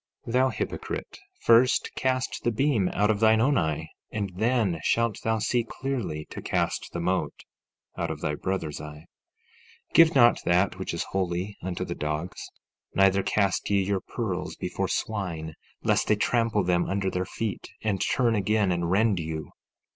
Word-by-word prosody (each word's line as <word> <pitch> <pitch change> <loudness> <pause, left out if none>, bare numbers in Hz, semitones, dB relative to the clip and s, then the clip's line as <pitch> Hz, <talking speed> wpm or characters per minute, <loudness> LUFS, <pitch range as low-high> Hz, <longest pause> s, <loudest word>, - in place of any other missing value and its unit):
14:5 115 - -5
Thou 130 +1 +4
hypocrite, 115 - -5 0.2
first 120 +3 +4
cast 130 -1 -1
the - - +2
beam 120 -5 +1
out 105 +2 +2
of 105 - -1
thine 110 0 +5
own 135 +5 +3
eye; 80 - 0 0.2
and 100 -3 -3
then 110 -5 +1
shalt 115 +5 +1
thou 110 0 +1
see 115 +3 +1
clearly 115 - -4
to - - -6
cast - - -1
the 85 - -4
mote 90 +2 -1 0.5
out - - -2
of - - -4
thy 75 - -1
brother's 80 -2 -3
eye. 75 +1 -9 0.8
14:6 - - -32
Give 165 -1 +6
not 120 -3 +6
that 90 +2 +2
which 95 - -3
is 85 - -1
holy 95 +1 -2
unto 90 -1 -3
the - - -4
dogs, 75 +4 -4 0.5
neither 95 0 +4
cast 100 -1 0
ye 100 -1 +3
your 95 0 -1
pearls - - -4
before - - -2
swine, 85 -7 -3 0.3
lest - - +2
they 105 - +4
trample 115 -1 +1
them 90 -1 +1
under 95 -1 0
their 90 - -1
feet, 110 +2 -4
and 100 -4 0
turn 120 -3 +2
again 105 -1 +2
and 85 -1 -1
rend 100 0 +3
you. 80 -1 -5
100 Hz, 170 wpm, -27 LUFS, 90-115 Hz, 0.8 s, Give